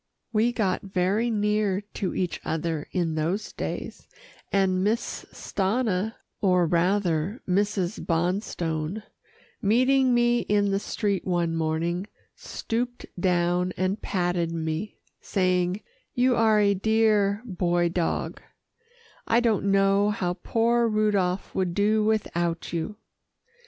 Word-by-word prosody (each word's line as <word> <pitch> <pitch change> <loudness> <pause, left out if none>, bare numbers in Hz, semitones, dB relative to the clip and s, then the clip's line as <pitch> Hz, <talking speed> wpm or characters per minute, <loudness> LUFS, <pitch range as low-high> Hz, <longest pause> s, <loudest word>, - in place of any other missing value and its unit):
We 225 +3 +3
got 205 -6 0
very 195 +4 0
near 210 -2 +1
to 190 - -3
each 180 -3 -2
other 160 -1 -2
in 170 -3 0
those 165 +7 -2
days, - - -5 0.4
and 190 -2 +2
Miss 220 +4 -1
Stanna, 210 0 -1 0.3
or 180 -3 +3
rather 175 - +1
Mrs. 195 0 0
Bonstone, 170 +1 -1 0.6
meeting 255 +4 +3
me 240 0 +3
in 205 -2 +1
the 195 - +1
street 200 -1 -1
one 175 -2 0
morning, 165 +4 -1 0.3
stooped 245 +2 -4
down 180 0 +1
and 185 +3 -1
patted 175 -2 -1
me, 160 +4 -3 0.2
saying, 185 0 0 0.3
"You 250 0 +3
are 220 -2 +4
a 200 -1 +4
dear 210 0 +2
Boy 175 -4 +1
Dog; 170 0 -2 0.9
I 230 - +4
don't 225 -5 +1
know 195 +1 +3
what 180 0 -2
poor 235 +1 +2
Rudolph 205 -4 0
would 180 -2 -1
do 215 +1 +3
without 175 -7 -1
you." 170 +6 -3
195 Hz, 115 wpm, -26 LUFS, 175-215 Hz, 0.9 s, are